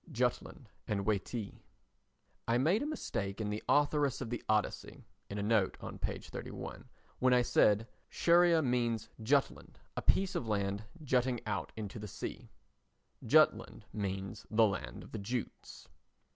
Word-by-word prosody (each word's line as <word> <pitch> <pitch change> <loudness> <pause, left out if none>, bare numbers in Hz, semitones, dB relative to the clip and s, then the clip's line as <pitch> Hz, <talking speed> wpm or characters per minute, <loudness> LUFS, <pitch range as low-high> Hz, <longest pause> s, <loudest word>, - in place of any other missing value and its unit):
Jutland - - -1 0.2
and 100 -2 -1
"Waitee" 110 +1 -2 0.9
I 115 - +3
made 165 - +3
a 290 - -1
mistake 100 - -3
in 105 -1 -2
The 105 - -3
Authoress 145 -2 +3
of 120 -3 -5
the 120 - -2
Odyssey 105 -1 -1 0.2
[in 100 - -5
a 100 - -1
note 105 -3 +2
on - - -7
p. - - -2
31] - - -8 0.3
when 130 0 +4
I 125 - +4
said 110 -1 +3 0.2
"Scheria 170 -1 +4
means 120 -3 0
Jutland—a 135 +5 -1
piece 195 0 +3
of 115 - -2
land 100 0 -1 0.2
jutting 125 -2 +1
out 105 - -2
into 110 0 -6
the 105 - -6
sea." - - -7 0.7
Jutland - - +3
means 95 +1 -4
the 110 +1 +5
Land 100 - -3
of - - -14
the 110 - -4
Jutes. 120 +4 -5
115 Hz, 145 wpm, -33 LUFS, 105-130 Hz, 0.9 s, the